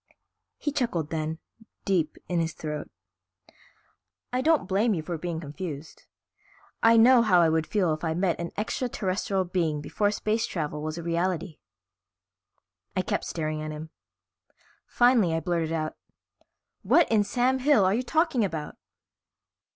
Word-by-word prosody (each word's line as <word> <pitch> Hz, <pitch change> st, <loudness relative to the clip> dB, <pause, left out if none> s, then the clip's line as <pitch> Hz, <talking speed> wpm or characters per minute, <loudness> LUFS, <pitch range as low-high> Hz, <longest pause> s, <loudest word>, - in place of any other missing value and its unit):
He 295 Hz, -, -2 dB
chuckled 230 Hz, -, -1 dB
then, 160 Hz, 0 st, -2 dB, 0.5 s
deep 170 Hz, -6 st, 0 dB
in 175 Hz, -1 st, 0 dB
his 165 Hz, -1 st, -1 dB
throat. 150 Hz, -1 st, -5 dB, 1.4 s
"I 250 Hz, -, +1 dB
don't 310 Hz, -, +2 dB
blame 205 Hz, +3 st, +2 dB
you 160 Hz, -, -3 dB
for 170 Hz, +2 st, -4 dB
being 165 Hz, 0 st, -4 dB
confused. 155 Hz, -1 st, -7 dB, 0.7 s
I 230 Hz, 0 st, +6 dB
know 240 Hz, +2 st, +7 dB
how 190 Hz, -6 st, +4 dB
I 165 Hz, -2 st, +5 dB
would 160 Hz, 0 st, 0 dB
feel 185 Hz, -7 st, +1 dB
if 155 Hz, -, -6 dB
I 160 Hz, -1 st, 0 dB
met 180 Hz, -1 st, 0 dB
an 170 Hz, 0 st, -3 dB
extraterrestrial 200 Hz, -4 st, -1 dB
being 170 Hz, -4 st, -1 dB
before 175 Hz, +8 st, 0 dB
space 215 Hz, +2 st, -1 dB
travel 150 Hz, -3 st, -3 dB
was 155 Hz, +1 st, -4 dB
a 170 Hz, -, -5 dB
reality." 170 Hz, 0 st, -2 dB, 1.4 s
I -, -, +2 dB
kept -, -, -2 dB
staring 155 Hz, -1 st, -3 dB
at 155 Hz, -, -4 dB
him. 155 Hz, +1 st, -7 dB, 1.0 s
Finally 240 Hz, -9 st, +3 dB
I -, -, +1 dB
blurted 165 Hz, -1 st, -1 dB
out, 155 Hz, -1 st, -2 dB, 0.8 s
"What 340 Hz, -, +4 dB
in 215 Hz, -2 st, +4 dB
Sam 255 Hz, +4 st, +1 dB
Hill 255 Hz, -7 st, +4 dB
are 185 Hz, -, +3 dB
you 235 Hz, -, +1 dB
talking 315 Hz, -3 st, +1 dB
about?" 160 Hz, -6 st, -4 dB
175 Hz, 150 wpm, -27 LUFS, 160-220 Hz, 1.4 s, know